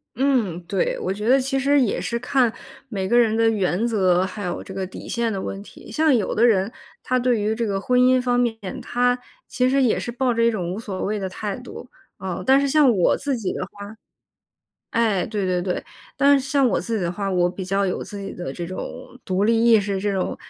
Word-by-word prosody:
嗯， 240 Hz, -9 st, +1 dB
对， 195 Hz, -2 st, 0 dB
我 185 Hz, -, -2 dB
觉 210 Hz, +2 st, -4 dB
得 265 Hz, +3 st, +5 dB
其 270 Hz, +1 st, -1 dB
实 280 Hz, +1 st, +3 dB
也 230 Hz, -, 0 dB
是 235 Hz, -1 st, -2 dB
看 245 Hz, -1 st, +2 dB, 0.4 s
每 195 Hz, -5 st, -3 dB
个 240 Hz, +3 st, +3 dB
人 225 Hz, -2 st, +4 dB
的 225 Hz, 0 st, +3 dB
原 205 Hz, +1 st, 0 dB
则， 185 Hz, -5 st, +2 dB
还 200 Hz, +2 st, -5 dB
有 175 Hz, -, -3 dB
这 -, -, -11 dB
个 190 Hz, 0 st, -3 dB
底 185 Hz, -, -10 dB
线 235 Hz, -2 st, -1 dB
的 190 Hz, -, -3 dB
问 195 Hz, -, -5 dB
题。 -, -, -14 dB
像 310 Hz, -3 st, +3 dB
有 220 Hz, -, -1 dB
的 230 Hz, +3 st, +4 dB
人， 205 Hz, -1 st, +3 dB, 0.3 s
他 255 Hz, -, 0 dB
对 245 Hz, -3 st, +1 dB
于 215 Hz, +1 st, 0 dB
这 235 Hz, -, -1 dB
个 195 Hz, -2 st, -2 dB
婚 250 Hz, +2 st, +2 dB
姻 255 Hz, 0 st, +5 dB
方 245 Hz, -1 st, +1 dB
面， 235 Hz, -2 st, +1 dB, 0.3 s
他 245 Hz, +1 st, +1 dB, 0.3 s
其 250 Hz, -1 st, +1 dB
实 270 Hz, +1 st, +2 dB
也 245 Hz, -, +2 dB
是 240 Hz, -, -4 dB
抱 250 Hz, +1 st, 0 dB
着 230 Hz, 0 st, +1 dB
一 235 Hz, -, +4 dB
种 180 Hz, -5 st, -3 dB
无 200 Hz, -, -4 dB
所 195 Hz, -5 st, -5 dB
谓 210 Hz, +1 st, -1 dB
的 195 Hz, -, -3 dB
态 200 Hz, +2 st, -4 dB
度， 245 Hz, 0 st, -10 dB, 0.3 s
呃。 190 Hz, -2 st, -4 dB
但 270 Hz, +1 st, +5 dB
是 280 Hz, -, +1 dB
像 300 Hz, -2 st, +5 dB
我 180 Hz, -, +3 dB
自 275 Hz, -2 st, -2 dB
己 215 Hz, -5 st, -3 dB
的 -, -, -3 dB
话 200 Hz, +1 st, -10 dB, 1.0 s
哎， 220 Hz, -5 st, +1 dB
对 210 Hz, -3 st, -2 dB
对 180 Hz, -1 st, 0 dB
对， 180 Hz, 0 st, -3 dB, 0.3 s
但 280 Hz, 0 st, +5 dB
是 265 Hz, -, -7 dB
像 275 Hz, -2 st, +3 dB
我 -, -, +1 dB
自 230 Hz, -1 st, -3 dB
己 200 Hz, -, -2 dB
的 170 Hz, -, -1 dB
话， 195 Hz, +1 st, -3 dB
我 175 Hz, -1 st, +2 dB
比 190 Hz, +1 st, -7 dB
较 195 Hz, +2 st, 0 dB
有 185 Hz, -, -2 dB
自 205 Hz, -, -8 dB
己 195 Hz, -, -6 dB
的 175 Hz, -7 st, -6 dB
这 170 Hz, +5 st, -5 dB
种 185 Hz, -, -5 dB, 0.3 s
独 190 Hz, +2 st, 0 dB
立 230 Hz, +1 st, +3 dB
意 230 Hz, -2 st, +7 dB
识， 200 Hz, -1 st, -2 dB
这 205 Hz, +1 st, 0 dB
种， 190 Hz, -2 st, -2 dB
220 Hz, 260 characters per minute, -22 LUFS, 190-245 Hz, 1.0 s, 意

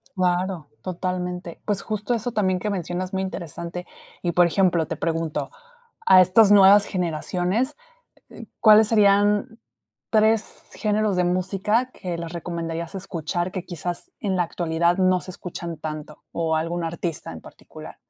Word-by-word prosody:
Claro, 180 Hz, -3 st, 0 dB
totalmente. 180 Hz, -1 st, -4 dB
Pues, 205 Hz, -2 st, -1 dB
justo 215 Hz, +2 st, -2 dB
eso 235 Hz, +1 st, -2 dB
también 185 Hz, -4 st, +1 dB
que 210 Hz, -, -2 dB
mencionas, 185 Hz, -1 st, -3 dB
muy 190 Hz, -, 0 dB
interesante. 170 Hz, -1 st, -6 dB, 0.4 s
Y, 175 Hz, -, 0 dB
por 175 Hz, 0 st, +5 dB
ejemplo, 175 Hz, -2 st, +2 dB
te 165 Hz, -, -3 dB
pregunto, 165 Hz, -1 st, -2 dB, 0.6 s
a 185 Hz, -, +8 dB
estas 195 Hz, +3 st, +5 dB
nuevas 200 Hz, 0 st, +7 dB
generaciones, 180 Hz, -, -1 dB, 0.6 s
eh, -, -, -9 dB
¿cuáles 215 Hz, -1 st, +7 dB
serían 205 Hz, +2 st, +3 dB, 0.5 s
3 220 Hz, 0 st, +2 dB
géneros 215 Hz, -2 st, 0 dB
de 180 Hz, -, +2 dB
música 190 Hz, +7 st, 0 dB
que 180 Hz, -8 st, -6 dB
les 170 Hz, 0 st, -6 dB
recomendarías 170 Hz, 0 st, -5 dB
escuchar, 175 Hz, -1 st, -3 dB
que 185 Hz, -2 st, -5 dB
quizás, 175 Hz, -, -5 dB
en 195 Hz, -5 st, -1 dB
la 180 Hz, -, +3 dB
actualidad 170 Hz, +1 st, 0 dB
no 185 Hz, -1 st, +3 dB
se 185 Hz, -, -9 dB
escuchan 170 Hz, -2 st, -7 dB
tanto, 155 Hz, -1 st, -7 dB
o 165 Hz, -1 st, 0 dB
algún 165 Hz, +2 st, -1 dB
artista 165 Hz, -, -4 dB
en 80 Hz, -, -9 dB
particular? -, -, -12 dB
180 Hz, 145 wpm, -23 LUFS, 170-200 Hz, 0.6 s, a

